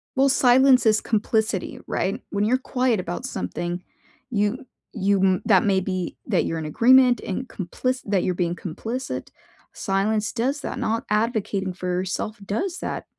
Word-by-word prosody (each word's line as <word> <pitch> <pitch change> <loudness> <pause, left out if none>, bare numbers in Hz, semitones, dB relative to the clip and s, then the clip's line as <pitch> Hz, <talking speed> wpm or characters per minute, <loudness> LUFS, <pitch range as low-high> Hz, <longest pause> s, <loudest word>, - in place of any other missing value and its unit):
Well, 270 +1 +4
silence 260 -1 +5
is 215 -1 +4
complicity, 220 -2 -1
right? 195 - -1
When 200 0 0
you're 240 +5 +3
quiet 255 -3 0
about 180 +7 -4
something, 175 -8 -4 0.5
you 220 +3 -1 0.3
you 200 -2 +1
m 185 -2 +3
that 190 -4 +5
may 195 -2 +3
be 185 -1 -3
that - - +2
you're 165 - -2
in 160 - -5
agreement 245 - +5
and 230 +7 -4
complic 255 +8 -3
that 200 -3 +1
you're 180 - 0
being 175 -1 -1
complicit. 225 +10 -5 0.4
Silence 210 +2 0
does 260 +5 0
that, - - -5
not 225 +1 -1
advocating 210 -3 0
for 180 0 -6
yourself 185 +4 -2
does 345 - -2
that. - - -4
210 Hz, 160 wpm, -24 LUFS, 190-250 Hz, 0.5 s, silence